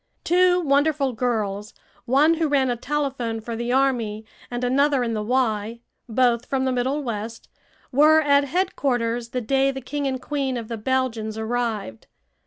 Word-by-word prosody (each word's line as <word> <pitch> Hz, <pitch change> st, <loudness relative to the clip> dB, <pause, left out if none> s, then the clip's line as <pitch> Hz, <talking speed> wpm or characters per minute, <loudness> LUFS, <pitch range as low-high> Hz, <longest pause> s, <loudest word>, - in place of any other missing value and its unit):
Two 360 Hz, +1 st, +4 dB
wonderful 285 Hz, -2 st, +2 dB
girls, 215 Hz, -3 st, -2 dB, 0.3 s
one 280 Hz, +6 st, +4 dB
who 325 Hz, -1 st, 0 dB
ran 270 Hz, -3 st, +2 dB
a -, -, 0 dB
telephone 260 Hz, -4 st, -2 dB
for 230 Hz, +1 st, -6 dB
the 235 Hz, +1 st, -3 dB
army 240 Hz, -5 st, 0 dB, 0.2 s
and 245 Hz, 0 st, -4 dB
another 275 Hz, +1 st, +2 dB
in 230 Hz, -1 st, -2 dB
the 215 Hz, -, -2 dB
"Y," 225 Hz, -1 st, -1 dB, 0.3 s
both 240 Hz, +1 st, +2 dB
from 265 Hz, -1 st, 0 dB
the 260 Hz, -, +1 dB
Middle 260 Hz, +4 st, -1 dB
West, 225 Hz, -1 st, -5 dB, 0.4 s
were 305 Hz, +4 st, +6 dB
at 285 Hz, -2 st, +3 dB
headquarters 245 Hz, -8 st, -1 dB
the 250 Hz, +1 st, -3 dB
day 270 Hz, +3 st, +2 dB
the 270 Hz, 0 st, -3 dB
King 285 Hz, +2 st, -3 dB
and 260 Hz, -1 st, -2 dB
Queen 270 Hz, -2 st, -2 dB
of 230 Hz, -2 st, -6 dB
the 230 Hz, -, -4 dB
Belgians 225 Hz, -2 st, -1 dB
arrived. 220 Hz, -, -3 dB
255 Hz, 165 wpm, -23 LUFS, 230-280 Hz, 0.4 s, were